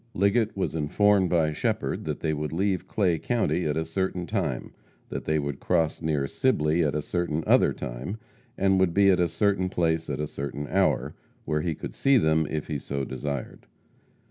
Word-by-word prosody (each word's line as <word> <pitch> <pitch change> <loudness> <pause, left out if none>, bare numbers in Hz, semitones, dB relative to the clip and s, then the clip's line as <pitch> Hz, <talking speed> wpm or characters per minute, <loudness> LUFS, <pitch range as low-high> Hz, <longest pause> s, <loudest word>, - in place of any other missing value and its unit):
Liggett 100 +2 +2
was 95 - -1
informed 95 +5 +3
by 80 -3 +2
Shepherd - - -2
that - - -3
they 80 - 0
would 75 0 -3
leave 95 +3 0
Clay 90 -6 +1
county 105 -7 0
at 75 0 -1
a 80 - -1
certain 90 +1 -2
time; 85 - -2 0.4
that - - -5
they 80 0 +1
would 70 -2 -3
cross 80 -4 0
near 75 -4 0
Sibley 85 - +1
at 75 -1 0
a 75 - -1
certain 85 -3 -1
other - - +5
time, 65 - -5 0.4
and 95 0 +3
would 95 -3 +2
be 100 0 +6
at 90 - +2
a 90 -1 +2
certain 95 +1 +1
place 80 -3 0
at 70 0 -3
a 75 - 0
certain 70 0 -5
hour, 95 0 +1 0.3
where 75 -1 0
he 80 -1 -2
could - - -7
see 135 -1 +3
them 80 - +2
if 75 -1 -3
he 75 -2 -3
so 70 0 -3
desired. 70 -2 -5
80 Hz, 195 wpm, -26 LUFS, 75-95 Hz, 0.4 s, be